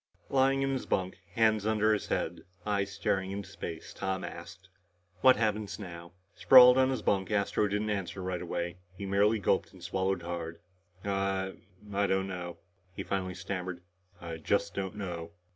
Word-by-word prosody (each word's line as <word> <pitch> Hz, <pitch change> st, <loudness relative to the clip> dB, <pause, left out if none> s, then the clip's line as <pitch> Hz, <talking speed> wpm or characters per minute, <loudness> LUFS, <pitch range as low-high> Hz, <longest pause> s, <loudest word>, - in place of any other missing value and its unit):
Lying 135 Hz, 0 st, +3 dB
in 135 Hz, -, +1 dB
his 130 Hz, -, -3 dB
bunk, 95 Hz, +1 st, -1 dB, 0.2 s
hands 110 Hz, -2 st, +3 dB
under 110 Hz, 0 st, +3 dB
his 105 Hz, -, -2 dB
head, 85 Hz, -, -2 dB, 0.2 s
eyes 100 Hz, -1 st, 0 dB
staring 95 Hz, -1 st, -1 dB
into 100 Hz, 0 st, -5 dB
space, 80 Hz, -2 st, -7 dB
Tom 95 Hz, 0 st, -2 dB
asked, 85 Hz, +3 st, -9 dB, 0.5 s
"What 130 Hz, 0 st, +8 dB
happens 105 Hz, -4 st, -1 dB
now?" 85 Hz, -4 st, -9 dB, 0.2 s
Sprawled 125 Hz, -1 st, +9 dB
on 130 Hz, 0 st, +4 dB
his 130 Hz, -, -2 dB
bunk, 95 Hz, -2 st, +1 dB
Astro 105 Hz, 0 st, +1 dB
didn't 105 Hz, +1 st, -1 dB
answer 95 Hz, -2 st, -3 dB
right 90 Hz, -1 st, -2 dB
away. 85 Hz, 0 st, -3 dB, 0.2 s
He 100 Hz, -, -5 dB
merely 100 Hz, +3 st, +3 dB
gulped 100 Hz, -, +1 dB
and 95 Hz, -3 st, -14 dB
swallowed 95 Hz, 0 st, -1 dB
hard. 85 Hz, -1 st, -5 dB, 0.5 s
"I 95 Hz, -1 st, 0 dB, 0.4 s
I 100 Hz, 0 st, +2 dB
don't 95 Hz, 0 st, +1 dB
know," 90 Hz, -2 st, -5 dB, 0.4 s
he -, -, -4 dB
finally 95 Hz, -2 st, -2 dB
stammered. 90 Hz, -2 st, -4 dB, 0.4 s
"I 85 Hz, -1 st, -6 dB
just 100 Hz, +5 st, 0 dB
don't 95 Hz, 0 st, -3 dB
know." 85 Hz, -5 st, -5 dB
95 Hz, 165 wpm, -30 LUFS, 90-105 Hz, 0.5 s, Sprawled